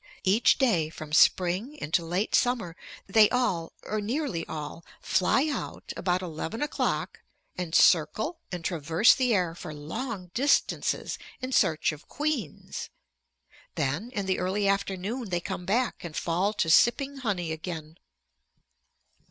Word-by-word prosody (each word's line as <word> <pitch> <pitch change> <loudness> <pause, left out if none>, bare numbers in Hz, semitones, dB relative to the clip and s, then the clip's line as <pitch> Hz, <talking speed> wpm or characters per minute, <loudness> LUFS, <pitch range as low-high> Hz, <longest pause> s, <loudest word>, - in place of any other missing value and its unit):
Each 200 +5 +4
day 180 - +2
from 155 -1 -9
spring 185 - +3
into 170 - -1
late 180 +6 -2
summer 235 -9 +1 0.3
they 210 +1 +5
all, 190 -10 0
or 215 0 -2
nearly 220 - -2
all, 155 +1 -6 0.2
fly 265 +10 +2
out 285 -6 -5
about 180 0 0
eleven 170 - -4
o'clock 295 - -2 0.4
and 175 -2 -3
circle 215 - +3
and 175 -3 -5
traverse 165 +5 +4
the 255 -2 +1
air 180 -6 +1
for 165 -2 -8
long 185 - -5
distances 280 +5 +1 0.2
in 255 +1 -5
search 160 -9 +2
of 155 0 -11
queens. 305 +1 -3 0.9
Then 155 - -1
in 200 -2 -1
the 190 -1 0
early 195 +2 0
afternoon 200 +4 -1
they 175 -1 0
come 175 +1 -6
back 240 +5 0
and 165 -3 -7
fall 180 +5 +1
to 165 - 0
sipping 275 - +4
honey 195 -10 -2
again. 160 0 -6
185 Hz, 135 wpm, -27 LUFS, 165-235 Hz, 0.9 s, they